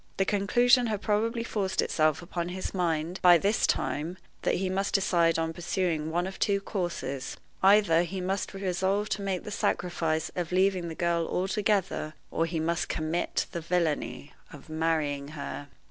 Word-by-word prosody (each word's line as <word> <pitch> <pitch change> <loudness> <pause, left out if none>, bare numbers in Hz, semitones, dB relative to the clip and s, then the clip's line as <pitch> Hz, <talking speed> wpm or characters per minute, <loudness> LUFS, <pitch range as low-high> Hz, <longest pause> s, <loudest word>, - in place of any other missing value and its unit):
The 195 - +2
conclusion 240 +5 +4
had 210 -2 -2
probably 230 +2 0
forced 200 -4 -2
itself 155 +1 +2
upon 170 0 -3
his 185 +1 -4
mind, 170 -1 -1
by 175 -2 +8
this 200 +5 +2
time, 165 +5 -1 0.2
that - - +1
he 190 +1 -1
must 195 +2 -1
decide 170 -4 +3
on 165 0 -1
pursuing 170 -2 -1
one 175 +2 0
of 190 0 -7
two 200 -1 +2
courses: 175 -9 -4 0.2
either 195 -4 +5
he 185 +2 -3
must 190 +2 -2
resolve 195 +2 0
to 200 0 -2
make 195 -2 -2
the 210 - -7
sacrifice 165 -5 -1
of 175 -1 -3
leaving 185 -1 +2
the 165 - -6
girl 170 -1 0
altogether, 190 -4 0 0.2
or 165 - 0
he 165 -1 -2
must 170 +2 -1
commit 160 +2 -1
the 170 - -4
villainy 165 -3 -1 0.2
of 145 +1 -13
marrying 155 -3 0
her. 145 0 -5
180 Hz, 165 wpm, -28 LUFS, 165-195 Hz, 0.2 s, by